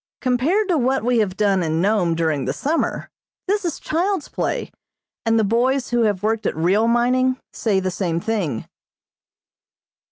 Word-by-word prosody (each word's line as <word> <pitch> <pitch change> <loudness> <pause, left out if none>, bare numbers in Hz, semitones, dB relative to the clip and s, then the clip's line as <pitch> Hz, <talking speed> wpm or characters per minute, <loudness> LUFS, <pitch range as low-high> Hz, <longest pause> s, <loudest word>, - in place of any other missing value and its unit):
Compared 280 - +1
to 345 -5 +2
what 265 +1 +1
we 245 0 +2
have 200 -3 -1
done 200 -3 +2
in 160 -1 0
Nome 185 -3 +2
during 160 -4 0
the - - -1
summer, 315 +4 -2 0.4
this 410 +2 +1
is 340 -3 -3
child's 360 +1 -1
play, - - -3 0.6
and 225 0 +3
the 220 - +3
boys 245 +5 +1
who 240 0 +2
have 205 -2 -1
worked 220 +1 0
at - - -2
real 190 +8 +2
mining 255 +2 +2
say 205 -4 +1
the 185 0 -2
same 170 -2 -1
thing. 175 - -2
225 Hz, 165 wpm, -21 LUFS, 185-260 Hz, 0.6 s, and